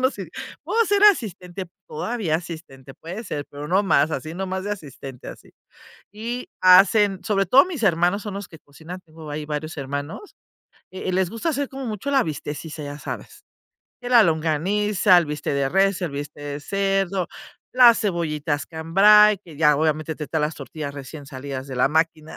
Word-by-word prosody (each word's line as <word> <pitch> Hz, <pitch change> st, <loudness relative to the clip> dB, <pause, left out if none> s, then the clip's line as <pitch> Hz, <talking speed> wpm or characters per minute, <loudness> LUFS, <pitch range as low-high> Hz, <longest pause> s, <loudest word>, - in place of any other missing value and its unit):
no 260 Hz, +1 st, +3 dB
sé, -, -, -8 dB, 0.4 s
puedo 460 Hz, 0 st, +2 dB
ser 410 Hz, 0 st, +2 dB
asistente, 195 Hz, -, +2 dB, 0.2 s
todavía 195 Hz, -1 st, -2 dB
asistente, 160 Hz, -6 st, -10 dB
puede 185 Hz, +8 st, -8 dB
ser, 145 Hz, -6 st, -5 dB
pero 145 Hz, +1 st, -7 dB
no 190 Hz, +3 st, +3 dB
más, 155 Hz, -6 st, +3 dB
así 155 Hz, +1 st, -4 dB
no 190 Hz, +1 st, -3 dB
más 190 Hz, 0 st, -4 dB
de 205 Hz, -, -3 dB
asistente 135 Hz, -8 st, -9 dB
así. -, -, -12 dB, 0.6 s
Y 235 Hz, +4 st, -5 dB
hacen 190 Hz, +1 st, +6 dB
sobre 195 Hz, -3 st, +1 dB
todo 260 Hz, +9 st, +6 dB
mis 335 Hz, -9 st, -6 dB
hermanos 175 Hz, +3 st, +2 dB
son 205 Hz, -2 st, -6 dB
los 200 Hz, -1 st, -6 dB
que 160 Hz, -, -13 dB
cocinan, 160 Hz, +6 st, -11 dB
tengo 160 Hz, -2 st, -12 dB
ahí 150 Hz, +1 st, -4 dB
varios 155 Hz, +2 st, -4 dB
hermanos, 145 Hz, -, -6 dB, 0.6 s
e 185 Hz, 0 st, -6 dB
eh, 185 Hz, -, 0 dB
les 185 Hz, -1 st, +1 dB
gusta 230 Hz, +8 st, -2 dB
hacer 285 Hz, -2 st, -2 dB
como 265 Hz, -1 st, -6 dB
mucho 220 Hz, +6 st, -4 dB
la 275 Hz, -1 st, +4 dB
bistequeada, 150 Hz, +1 st, -6 dB
ya 145 Hz, +1 st, -7 dB
sabes, -, -, -8 dB, 0.6 s
que 245 Hz, -, -6 dB
la 235 Hz, -3 st, +8 dB
longaniza, 180 Hz, +5 st, +2 dB
el 170 Hz, -, 0 dB
bistec 150 Hz, -1 st, -3 dB
de 140 Hz, -1 st, +1 dB
res, 195 Hz, +3 st, +2 dB
el 175 Hz, -, -2 dB
bistec 145 Hz, +1 st, -7 dB
de 145 Hz, 0 st, -5 dB
cerdo, 195 Hz, 0 st, 0 dB, 0.5 s
las 245 Hz, -2 st, +7 dB
cebollitas 155 Hz, -7 st, -2 dB
cambray, 200 Hz, +6 st, +5 dB
que 170 Hz, -6 st, -15 dB
ya 150 Hz, -1 st, +4 dB
obviamente 155 Hz, +1 st, 0 dB
te 150 Hz, -, -6 dB
traen 160 Hz, -2 st, -1 dB
las 155 Hz, +2 st, -1 dB
tortillas 145 Hz, -3 st, -7 dB
recién 140 Hz, +1 st, -9 dB
salidas 135 Hz, -1 st, -6 dB
de 130 Hz, -, -6 dB
la 125 Hz, -, +3 dB
máquina, 160 Hz, 0 st, -1 dB
170 Hz, 185 wpm, -23 LUFS, 150-205 Hz, 0.6 s, la